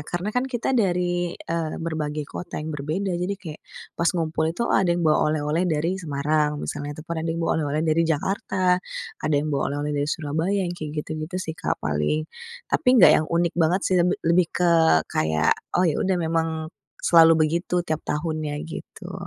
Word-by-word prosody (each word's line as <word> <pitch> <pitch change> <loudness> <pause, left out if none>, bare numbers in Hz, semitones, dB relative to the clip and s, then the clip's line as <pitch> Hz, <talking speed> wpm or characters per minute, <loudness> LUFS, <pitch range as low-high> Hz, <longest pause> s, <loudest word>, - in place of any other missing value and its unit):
karena 180 +5 -3
kan 250 +2 0
kita 245 +1 -1
dari, 175 -6 0
eee, 165 -2 -3
berbagai 150 -2 -3
kota 175 - -7
yang 155 +1 -4
berbeda. 155 +7 -2
Jadi 180 +3 -1
kayak 160 -6 -9 0.3
pas 170 - +1
ngumpul 160 -1 0
itu, 235 - 0
ada 190 - +3
yang 175 0 +1
bawa 155 -1 +4
oleh-oleh 155 +4 0
dari 165 +5 -1
Semarang 150 0 0
misalnya, 145 0 -5
ataupun 160 +2 -6
ada 165 - -3
yang 165 +1 -2
bawa - - +1
oleh-oleh 150 +1 -1
dari 160 +1 +2
Jakarta, 185 +2 +1 0.4
ada 155 - 0
yang 150 +1 -1
bawa 140 - 0
oleh-oleh 145 +1 -2
dari 145 - -1
Surabaya, 160 +6 -1
yang 175 - -3
kayak 155 -3 -5
gitu-gitu 155 +3 -5
sih, 185 -3 -3
Kak, 165 0 -2
paling. 75 - 0 0.5
Tapi 315 - +2
enggak - - +8
yang 155 - -3
unik 170 0 +1
banget 170 +3 +2
sih, 185 -1 +3
lebih 180 +2 +2
lebih 170 +1 +4
ke 175 -1 +1 0.4
kayak, 80 0 +2 0.2
oh 180 - +3
ya 160 -4 +1
udah 190 -1 +1
memang 165 -1 0 0.6
selalu 165 -1 +7
begitu 170 +2 -1
tiap 155 -2 -2
tahunnya 155 -1 -3
gitu. 175 +2 -9
165 Hz, 185 wpm, -24 LUFS, 150-180 Hz, 0.6 s, enggak